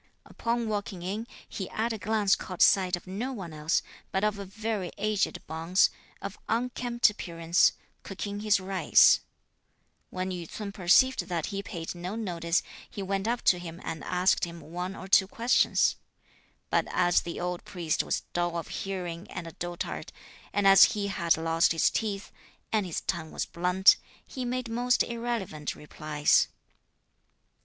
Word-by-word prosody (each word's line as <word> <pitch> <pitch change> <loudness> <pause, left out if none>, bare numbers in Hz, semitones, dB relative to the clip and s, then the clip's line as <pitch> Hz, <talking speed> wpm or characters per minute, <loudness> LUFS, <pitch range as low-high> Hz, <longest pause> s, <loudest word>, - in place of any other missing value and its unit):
Upon 235 0 -2
walking 205 -4 -3
in, 210 +5 -3 0.2
he 190 - -5
at 230 +1 -1
a 220 - -5
glance 205 +1 +2
caught 185 -2 0
sight 185 -2 +4
of 175 - -11
no 205 +8 -4
one 190 -10 -7
else, 155 +1 0 0.3
but 190 - 0
of 210 -1 +1
a 200 - -5
very 210 -1 -3
aged 210 -1 -1
bonze, 165 +4 +2 0.3
of 200 0 -6
unkempt 240 0 +1
appearance, 170 -3 +2 0.3
cooking 200 +1 -5
his 210 -1 +3
rice. 190 0 +5 0.9
When 185 0 -3
Yü 175 -3 -6
ts'un 210 -2 -6
perceived 195 +3 +4
that 170 -3 -2
he 195 - -2
paid 170 -4 -6
no 180 +3 -5
notice, 175 -6 -1 0.3
he 200 - -6
went 195 +2 -1
up 240 +1 -1
to 180 - +4
him 170 -1 -8
and 160 -3 -5
asked 180 +1 +2
him 170 -1 -3
one 180 +4 -5
or 190 - -8
two 190 0 +5
questions, 235 +5 +2 0.7
but - - +2
as 175 -1 +3
the 170 - -6
old 180 0 -3
priest 170 -4 -1
was - - -1
dull 175 -1 0
of 170 - -5
hearing 180 -2 -5
and 175 - -6
a 165 - -7
dotard, 175 +1 -5 0.4
and 205 -1 0
as 195 +1 +8
he 205 -2 -2
had 170 -4 +2
lost 165 +1 +2
his 165 - +3
teeth, 205 -3 -3 0.4
and 210 -4 +2
his 170 - -3
tongue 165 -4 -3
was - - -3
blunt, 180 +2 +4 0.3
he 255 -2 -5
made 250 0 -2
most 245 +2 +2
irrelevant 230 -11 -3
replies. 150 0 +1
190 Hz, 165 wpm, -28 LUFS, 175-210 Hz, 0.9 s, as